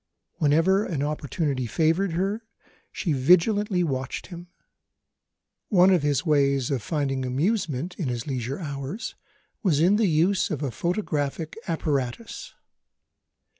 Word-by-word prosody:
Whenever 165 +6 +3
an 150 -8 -2
opportunity 145 -3 -2
favoured 165 - +1
her, 195 +6 -1 0.5
she 165 - -1
vigilantly 180 - +3
watched 135 -4 -3
him. 175 -1 -10 1.2
One 190 -2 +6
of 180 -4 +4
his 145 -2 0
ways 140 -4 +2
of 135 -4 0
finding 135 -1 -1
amusement, 160 - -1
in 165 - -1
his 120 -1 -3
leisure 130 -1 -3
hours, 145 - -5 0.5
was 170 -9 +2
in 185 +6 +4
the 220 -2 +3
use 170 +5 +2
of 155 -4 -3
a 135 - -1
photographic 160 - -2
apparatus. 155 - -3
155 Hz, 125 wpm, -25 LUFS, 140-185 Hz, 1.2 s, One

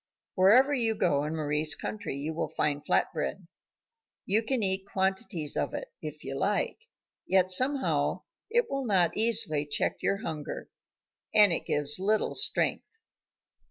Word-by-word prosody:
Wherever 240 +10 +5
you 230 -5 +1
go 145 -7 +1
in 155 +2 -3
Mari's 150 0 0
country 205 -8 -5
you 150 +3 -4
will 160 - -2
find 145 -1 -2
flat - - +1
bread. - - -4 0.8
You 210 +3 +2
can 230 0 -1
eat 190 0 +2
quantities 190 -5 -2
of - - -2
it, - - -7
if 150 -1 -8
you 135 0 -5
like, 205 - -1 0.4
yet 185 -1 +2
somehow 260 +7 +1 0.3
it 475 +2 +2
will 275 -1 -3
not 180 -5 +2
easily 220 -9 +3
check 145 -1 -1
your 200 +2 -1
hunger, 155 -2 -6 0.6
and 205 -4 +6
it - - -3
gives 145 +2 +1
little 210 +3 0
strength. 450 +1 -1
190 Hz, 150 wpm, -28 LUFS, 150-220 Hz, 0.8 s, and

